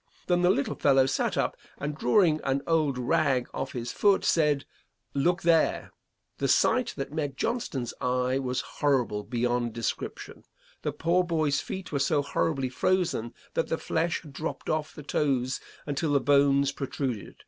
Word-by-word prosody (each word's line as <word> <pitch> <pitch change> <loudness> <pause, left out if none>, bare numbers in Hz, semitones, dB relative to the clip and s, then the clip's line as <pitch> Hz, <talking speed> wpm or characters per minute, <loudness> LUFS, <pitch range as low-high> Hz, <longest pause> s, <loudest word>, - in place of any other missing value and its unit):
Then 175 -1 +2
the 180 - +4
little 140 -6 +1
fellow 135 -2 +4
sat 135 - 0
up - - 0 0.2
and 150 +1 -3
drawing 160 -2 +3
on 135 +1 0
old 155 -5 +1
rag 135 -1 +1
off 135 - -4
his 120 -1 -4
foot 200 -2 +3
said, 150 -4 +2 0.5
'Look 170 +6 +1
there.' 165 -1 +2 0.5
The - - +1
sight 255 -2 +2
that 135 +1 -4
met 145 -4 -2
Johnston's 145 - -2
eye 125 +1 +1
was 130 -1 -1 0.2
horrible 130 -7 +2
beyond 120 +1 -1
description. 115 -1 -5 0.4
The - - -1
poor 175 +2 +1
boy's 155 -5 +1
feet 190 -2 -6
were 140 - 0
so 145 +1 +2
horribly 140 -1 0
frozen 165 -6 0 0.2
that - - 0
the - - -1
flesh 170 +1 -1
had 150 -4 -12
dropped 155 +3 -4
off 155 0 -2
the 150 - -9
toes 135 -3 0 0.3
until 145 +1 -1
the 140 - +5
bones 140 0 +4
protruded. 130 - -4
140 Hz, 160 wpm, -28 LUFS, 130-160 Hz, 0.5 s, the